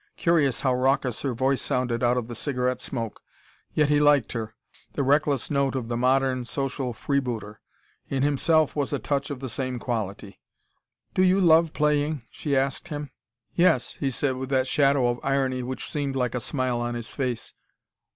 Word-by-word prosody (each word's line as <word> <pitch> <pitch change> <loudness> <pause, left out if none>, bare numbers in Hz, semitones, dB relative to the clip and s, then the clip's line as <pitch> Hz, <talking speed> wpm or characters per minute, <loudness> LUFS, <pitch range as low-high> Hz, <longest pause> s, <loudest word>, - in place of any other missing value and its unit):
Curious 155 -8 +2
how 130 -2 +2
raucous 130 -1 +1
her 135 -4 -2
voice 130 +2 +1
sounded 125 -1 -1
out 120 0 +3
of 120 -2 -2
the 120 - -6
cigarette 125 0 -1
smoke. 115 -5 -4 0.5
Yet 150 -1 +3
he 145 0 +4
liked 145 -4 +4
her 110 -2 -5 0.4
the 140 - 0
reckless 145 0 +2
note 140 -1 +1
of 120 -3 -3
the 120 - -1
modern, 130 +1 +2
social 135 0 -2
freebooter. 120 -4 -3 0.5
In 135 -1 0
himself 150 +2 +2
was 145 -3 -1
a 145 - 0
touch 140 0 -2
of 140 -3 -5
the 135 - -3
same 130 +1 -3
quality. 105 -5 -4 0.7
"Do - - +2
you 185 +1 +4
love 165 -3 +5
playing?" 150 -2 +1
she 140 -3 -1
asked 135 +5 -1
him. 145 -4 -5 0.4
"Yes," 170 -8 +2
he 140 - 0
said, 130 0 -1
with 130 0 -5
that 130 -1 +2
shadow 140 -1 +3
of 120 0 -1
irony 135 -2 0
which 130 +1 -4
seemed 140 -3 -2
like 125 -3 0
a 125 - -1
smile 130 -1 -1
on 120 0 -2
his 120 -1 -6
face. 125 -4 -3
135 Hz, 180 wpm, -26 LUFS, 125-145 Hz, 0.7 s, love